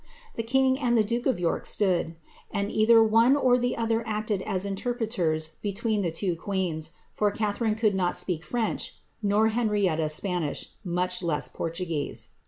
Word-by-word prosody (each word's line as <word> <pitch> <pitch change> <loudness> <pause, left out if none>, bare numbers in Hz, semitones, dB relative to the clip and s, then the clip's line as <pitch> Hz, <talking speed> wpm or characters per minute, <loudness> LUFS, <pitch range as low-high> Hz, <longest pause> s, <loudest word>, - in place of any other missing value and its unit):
The - - -2
king 260 +3 +2
and 240 -3 +2
the 220 - +5
duke 235 +4 -1
of 255 -8 +1
York 170 -2 -1
stood; 175 -5 +1 0.3
and 200 +1 -2
either 225 +1 +6
one 225 +4 +5
or 255 -3 +3
the 245 0 -1
other 225 0 +1
acted 215 -2 -1
as 190 -2 -2
interpreters 195 -7 -1
between 210 +1 -1
the 175 - 0
two 175 +2 -1
queens,' 170 -4 -2 0.2
for 210 - +2
Catharine 215 +1 -1
could 215 -2 +2
not 180 -2 0
speak 170 -4 -2
French, 225 +8 -2 0.3
nor 210 +1 +3
Henrietta 205 -9 +1
Spanish, 175 -1 -2
much 180 0 -1
less 165 -4 0
Portugueie. 165 -3 -3
205 Hz, 160 wpm, -27 LUFS, 180-225 Hz, 0.3 s, either